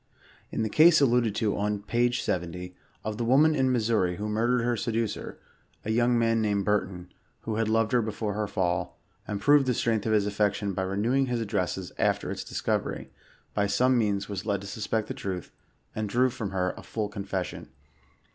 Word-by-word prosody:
In 110 - -1
the - - 0
case 155 +7 +6
alluded 120 -5 +3
to 105 -2 0
on 105 0 -1
page 120 +2 +1
70, 90 0 -3 0.3
of 110 0 -4
the - - 0
woman 140 +7 +5
in 130 -3 +2
Missouri 110 -7 +1
who 105 +3 -4
murdered 115 +3 +1
her 120 0 +1
seducer; 115 0 -3 0.5
a 110 - -1
young 120 +1 +3
man 115 -1 +2
named 100 -2 0
Burton, 95 -4 -1 0.3
who 110 -1 -3
had 110 -1 +1
loved 115 0 +2
her 125 -1 +3
before 110 -1 -3
her 105 0 -2
fall, 90 -3 -1 0.3
and 105 -1 -3
proved 145 +4 +4
the 125 - +2
strength 110 -2 0
of - - +1
his 105 -2 +3
afiection 105 -1 0
by 95 - -2
renewing 110 +8 +1
his 120 -1 -1
addresses 95 -4 -2
after - - +1
its - - -4
discovery, - - -2 0.4
by 100 -1 +1
some 125 +5 +3
means 100 -4 +1
was 100 -1 -4
led 100 -3 -1
to - - -9
suspect 110 +1 -2
the - - -4
truth, 95 -3 -5 0.4
and 110 -1 -2
drew 125 +4 +2
from 110 -4 -4
hejr 90 -1 -1
a - - -10
full 110 -2 -3
confession. 100 -3 -5
110 Hz, 195 wpm, -27 LUFS, 100-120 Hz, 0.5 s, case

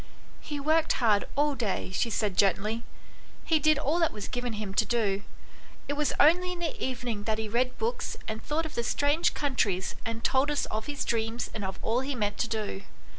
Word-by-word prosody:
" - - -25
He 295 - -2
worked 315 +3 +3
hard 215 -5 +3
all 295 +1 +3
day," 215 -7 -2
she 230 +5 0
said 210 -3 0
gently; 205 +4 +2 0.3
" - - -24
he 320 -2 +3
did 310 0 +4
all 305 +4 +1
that 330 - +3
was 210 -1 -6
given 245 -2 -3
him 210 -2 -4
to 210 - +3
do. 205 -3 +1 0.7
It 285 - 0
was 295 -1 +1
only 360 +4 +5
in - - -7
the 340 -2 -3
evening 240 -5 -3
that 220 -1 +1
he 220 0 -3
read 250 +4 0
books 470 +1 -2
and 220 0 -4
thought 320 +2 -1
of 315 - -6
the - - 0
strange 285 +6 +2
countries 210 -10 0
and 230 -1 -4
told 270 +2 +3
us 295 - +1
of 215 0 -3
his 290 -1 -2
dreams 225 +1 -1
and 215 - -4
of 190 0 -3
all 230 +2 +2
he 265 +1 -2
meant 205 -3 -1
to - - +1
do. 210 -3 -3
240 Hz, 220 wpm, -29 LUFS, 215-295 Hz, 0.7 s, only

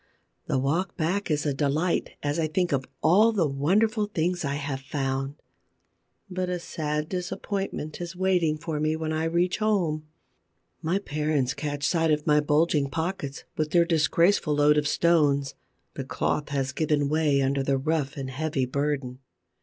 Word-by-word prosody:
The - - +1
walk 155 +9 -1
back 180 +4 -1
is 150 -1 0
a 145 - +1
delight, 150 +5 0
as 145 +2 -1
I 160 - +1
think 175 +3 0
of 135 -2 0 0.2
all 210 +7 +5
the 190 -8 +1
wonderful 205 - +1
things 175 -2 -1
I 140 -1 -1
have 140 -2 -3
found. 135 0 -2 0.9
But 185 -1 -3
a 180 - -1
sad 150 -3 -3
disappointment 185 -2 -4
is 175 +1 -5
waiting 180 -4 +1
for 155 -1 -4
me 155 +1 +1
when 160 0 -3
I 160 +1 0
reach 175 +3 +1
home. 175 -8 0 0.7
My 170 +3 +1
parents 150 -7 -1
catch 145 0 -4
sight 165 0 +2
of 150 -1 +1
my 150 -1 +4
bulging 150 -1 +2
pockets, 160 -3 -3
with 155 -1 -1
their 170 +1 +4
disgraceful 165 0 +2
load 150 +1 +4
of 145 - -1
stones. 145 -5 +2 0.4
The - - -4
cloth 150 - -1
has 135 -2 -1
given 145 0 +1
way 150 -2 +2
under 135 +1 +1
the 135 0 +1
rough 150 0 -1
and 135 -1 -4
heavy 145 -1 -1
burden. 135 -1 -2
155 Hz, 165 wpm, -26 LUFS, 145-170 Hz, 0.9 s, all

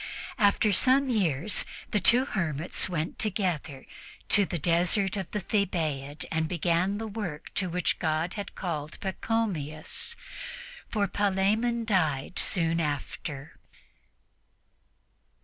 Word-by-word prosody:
After 205 0 +4
some 265 +5 +4
years, 180 - +2 0.3
the 210 - +2
two 240 +7 +5
hermits 170 - -2
went 165 -2 -3
together 180 -10 -1 0.4
to 205 -2 +7
the 175 - -2
desert 175 +5 +2
of 190 -4 -4
the 210 - -3
Thebaid 155 -8 -1
and 160 0 +1
began 175 +3 +1
the 225 - -4
work 200 -8 -5
to 185 -2 0
which 180 +1 0
God 160 +1 0
had 205 -2 -6
called 155 -4 -4
Pachomius, 190 - -1 0.7
for 205 -2 +1
Palemon 205 +5 +1
died 160 -8 +1
soon 165 -2 +1
after. 145 -1 -4
180 Hz, 115 wpm, -28 LUFS, 160-205 Hz, 0.7 s, to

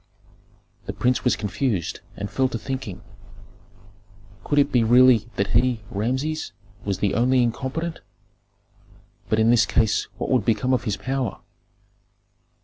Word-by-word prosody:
The - - -3
prince 125 0 0
was 125 - +3
confused 105 - -2 0.2
and 100 - -4
fell 130 +4 0
to 115 - -3
thinking. 130 -7 -6 1.4
Could 145 - -1
it 145 - +4
be 120 -2 +3
really 120 -1 +5
that 100 +1 -1
he, 120 0 +2
Rameses, 130 +9 -2 0.3
was 100 -3 -2
the 100 0 0
only 125 +2 +3
incompetent? 135 +8 -3 1.3
But 110 - +2
in 110 +1 +4
this 110 -4 +4
case 110 -2 +1
what - - -3
would 125 -5 +3
become 115 +4 +1
of 125 -1 0
his 105 -4 -1
power? 130 +4 -3
120 Hz, 140 wpm, -23 LUFS, 110-130 Hz, 1.4 s, really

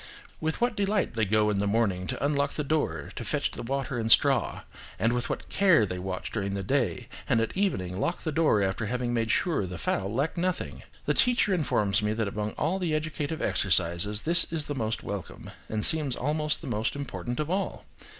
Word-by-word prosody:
With 160 0 -2
what 240 -1 +1
delight 205 0 0
they 110 -2 +1
go 105 +1 +2
in 100 - 0
the 100 - +1
morning 100 -4 +1
to 140 - -2
unlock 145 -1 +1
the 150 - -2
door, 135 - -1
to - - -4
fetch - - -1
water 135 0 -3
and 115 0 0
straw, - - +4 0.4
and 115 +4 +2
with 120 0 -1
what - - -4
care 185 - +4
they 90 -2 -4
watch 95 0 -4
during 100 -2 -2
the 100 - -3
day, 130 +4 0 0.2
and 115 - +4
at 115 - -1
evening 95 - -1
lock 170 - -1
the 160 - -1
door 150 -10 +3
after 95 +3 -1
having 125 +1 -1
made 115 -1 0
sure 170 - +2
that 95 - -3
the 90 -1 -6
fowl 95 +5 -1
lack 140 +9 -1
nothing! 120 - -2 0.2
The 150 - +2
teacher 240 0 +3
informs 105 - +1
me 105 0 0
that 110 -1 -1
among 105 +1 -3
all 180 +5 -1
the 170 -4 0
educative 155 0 -3
exercises 95 +2 +2
this 170 +1 +4
is 160 -3 -1
the 145 - -3
most 115 -5 -2
welcome, 100 -3 -6 0.2
and 110 -1 0
seems 150 -5 +3
also 150 +2 0
the - - -10
most 110 +6 -1
important 135 -3 -4
of 155 +2 -2
all. 195 +1 -2
120 Hz, 210 wpm, -28 LUFS, 100-155 Hz, 0.4 s, straw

